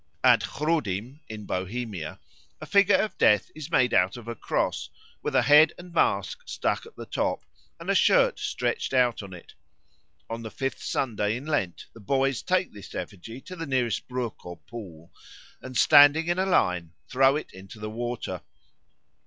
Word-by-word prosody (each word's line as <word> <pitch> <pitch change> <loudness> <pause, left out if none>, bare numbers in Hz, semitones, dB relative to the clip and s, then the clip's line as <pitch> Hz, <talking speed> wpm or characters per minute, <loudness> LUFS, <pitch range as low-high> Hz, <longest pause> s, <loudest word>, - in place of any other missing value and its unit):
At - - +6
Chrudim, 135 - -2
in 105 -2 -7
Bohemia, 95 -3 -4 0.4
the - - -9
figure 200 0 +4
of 215 -3 0
Death 105 -1 +4
is 155 0 -8
made 130 -7 +2
out 90 +5 +3
of 120 -1 -11
a 120 - -3
cross, - - -2 0.3
with - - -3
a - - +5
head 150 +2 +6
and 175 0 -12
mask - - +1
stuck - - -2
at 455 - -16
the - - -8
top, - - -2 0.3
and - - -10
a - - +2
shirt - - +4
stretched 455 - -2
out 125 -3 +3
on 100 -2 -10
it. 90 -2 -12 0.7
On 115 0 -5
the 110 - -6
fifth 135 +4 -4
Sunday 110 -3 -1
in 130 - -9
Lent 95 - -2
the 115 - -13
boys 135 +3 0
take 185 0 0
this 100 -2 -11
effigy 115 +6 -7
to 185 - -9
the 165 -2 -6
nearest 125 -4 -1
brook 125 -3 -4
or 90 -1 -8
pool, 85 -6 -11 0.5
and 130 -1 -6
standing 145 +3 +7
in 175 +2 0
a 190 - +1
line 90 - +1
throw 135 +2 +4
it 150 - -5
into 95 +3 -12
the 110 0 -5
water. 120 +1 -4
125 Hz, 180 wpm, -26 LUFS, 105-150 Hz, 0.7 s, standing